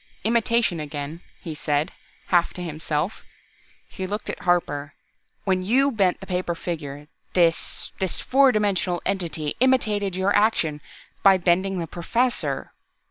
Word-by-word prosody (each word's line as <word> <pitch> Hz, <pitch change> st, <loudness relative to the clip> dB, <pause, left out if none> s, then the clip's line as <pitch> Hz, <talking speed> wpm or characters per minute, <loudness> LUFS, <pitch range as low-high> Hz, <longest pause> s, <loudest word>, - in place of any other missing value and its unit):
"Imitation 230 Hz, -4 st, +2 dB
again!" 150 Hz, +2 st, -5 dB, 0.2 s
he 165 Hz, -, -5 dB
said, 150 Hz, +2 st, 0 dB, 0.4 s
half 175 Hz, -2 st, +3 dB
to 180 Hz, -, -5 dB
himself. 155 Hz, +2 st, -3 dB, 0.6 s
He 190 Hz, -1 st, -5 dB
looked 210 Hz, +3 st, -3 dB
at -, -, -8 dB
Harper. 145 Hz, -5 st, 0 dB, 0.5 s
"When 190 Hz, -2 st, +1 dB
you 260 Hz, +9 st, +3 dB
bent 195 Hz, -6 st, +2 dB
the -, -, -9 dB
paper 180 Hz, -1 st, -2 dB
figure 150 Hz, -4 st, -5 dB, 0.3 s
this 170 Hz, -2 st, +1 dB
this 190 Hz, -3 st, -1 dB
fourth 270 Hz, 0 st, +4 dB
dimensional 190 Hz, -4 st, 0 dB
entity 170 Hz, -6 st, -1 dB
imitated 215 Hz, -7 st, +2 dB
your 190 Hz, +2 st, +2 dB
action 175 Hz, -8 st, +2 dB, 0.4 s
by 195 Hz, -1 st, +7 dB
bending 185 Hz, +2 st, +1 dB
the 170 Hz, -, -2 dB
Professor. 235 Hz, +10 st, -1 dB
180 Hz, 135 wpm, -24 LUFS, 165-205 Hz, 0.6 s, by